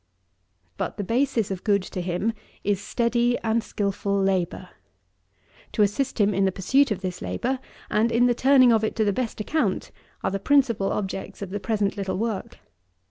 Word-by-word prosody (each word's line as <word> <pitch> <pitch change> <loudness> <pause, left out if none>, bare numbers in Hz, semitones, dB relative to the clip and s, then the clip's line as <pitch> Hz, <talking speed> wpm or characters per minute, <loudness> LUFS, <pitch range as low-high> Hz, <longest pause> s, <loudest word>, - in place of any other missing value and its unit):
16. 85 +1 -41
But, - - -3
the 205 - -2
basis 230 -1 0
of 185 -2 -4
good 200 -3 +2
to 185 - -5
him, 180 +6 -1 0.3
is 200 -1 0
steady 240 +2 +1
and 225 0 +1
skilful 200 0 -1
labour. 185 -1 0 1.0
To 210 - +3
assist 250 +6 -1
him 205 0 +3
in 195 +1 +2
the 190 - +2
pursuit 265 +10 +2
of 200 -4 -2
this 180 -2 -4
labour, 260 +2 -2 0.3
and 225 +2 +2
in 240 +1 +4
the 245 - +4
turning 260 0 +5
of 220 -1 +2
it 220 - -1
to 220 - +1
the 205 - +2
best 240 0 -3
account, 310 +9 -1 0.3
are - - 0
the 195 - -2
principal 235 -5 +2
objects 195 0 -4
of 190 - -7
the 205 - -2
present 210 -1 -1
little 195 -2 -2
work. 220 -2 -3
210 Hz, 190 wpm, -25 LUFS, 195-235 Hz, 1.0 s, turning